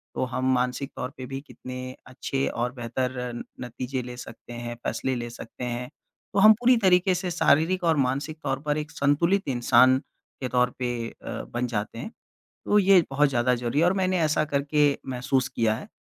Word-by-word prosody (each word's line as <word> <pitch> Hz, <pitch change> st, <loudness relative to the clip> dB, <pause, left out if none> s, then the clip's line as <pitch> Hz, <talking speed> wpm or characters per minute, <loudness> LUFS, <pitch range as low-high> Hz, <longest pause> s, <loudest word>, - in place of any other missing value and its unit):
तो -, -, 0 dB
हम 130 Hz, +1 st, +1 dB
मानसिक 125 Hz, +3 st, -1 dB
तौर 125 Hz, -, -4 dB
पे 130 Hz, -, -6 dB
भी 135 Hz, +1 st, -5 dB
कितने 130 Hz, -1 st, -8 dB
अच्छे 135 Hz, +1 st, -2 dB
और 120 Hz, +1 st, -2 dB
बेहतर 125 Hz, +1 st, -2 dB, 0.2 s
न -, -, -5 dB, 0.2 s
नतीजे 125 Hz, +2 st, -4 dB
ले 125 Hz, 0 st, -8 dB
सकते 120 Hz, 0 st, -10 dB
हैं, 120 Hz, 0 st, -5 dB
फ़ैसले 130 Hz, -1 st, -1 dB
ले 120 Hz, -1 st, -4 dB
सकते 120 Hz, -, -9 dB
हैं। 125 Hz, 0 st, -3 dB, 0.4 s
तो 200 Hz, -, +2 dB
हम 215 Hz, +2 st, +9 dB
पूरी 245 Hz, 0 st, +5 dB
तरीके 185 Hz, -3 st, +4 dB
से 180 Hz, -1 st, -2 dB
शारीरिक 165 Hz, +2 st, +3 dB
और 165 Hz, -2 st, +3 dB
मानसिक 145 Hz, +4 st, -3 dB
तौर 135 Hz, 0 st, -1 dB
पर 150 Hz, 0 st, +1 dB
एक 150 Hz, -1 st, -4 dB
संतुलित 170 Hz, +7 st, +1 dB
इंसान 130 Hz, 0 st, +5 dB, 0.4 s
के 130 Hz, -, -1 dB
तौर 125 Hz, 0 st, +3 dB
पे 125 Hz, -1 st, -1 dB, 0.2 s
अ, -, -, -7 dB
बन 120 Hz, +1 st, -3 dB
जाते 115 Hz, -1 st, -3 dB
हैं। 220 Hz, -, -6 dB, 0.5 s
तो 210 Hz, -, +4 dB
ये 195 Hz, -2 st, +6 dB
बहुत 145 Hz, +2 st, +3 dB
ज़्यादा 125 Hz, -1 st, +2 dB
ज़रूरी 120 Hz, +3 st, -2 dB
है 170 Hz, -, +4 dB
और 180 Hz, -, +4 dB
मैंने 185 Hz, 0 st, +1 dB
ऐसा 155 Hz, -1 st, +2 dB
करके 145 Hz, 0 st, +2 dB, 0.2 s
महसूस 130 Hz, +1 st, 0 dB
किया 110 Hz, -1 st, +1 dB
है। -, -, -8 dB
130 Hz, 195 wpm, -26 LUFS, 125-155 Hz, 0.5 s, हम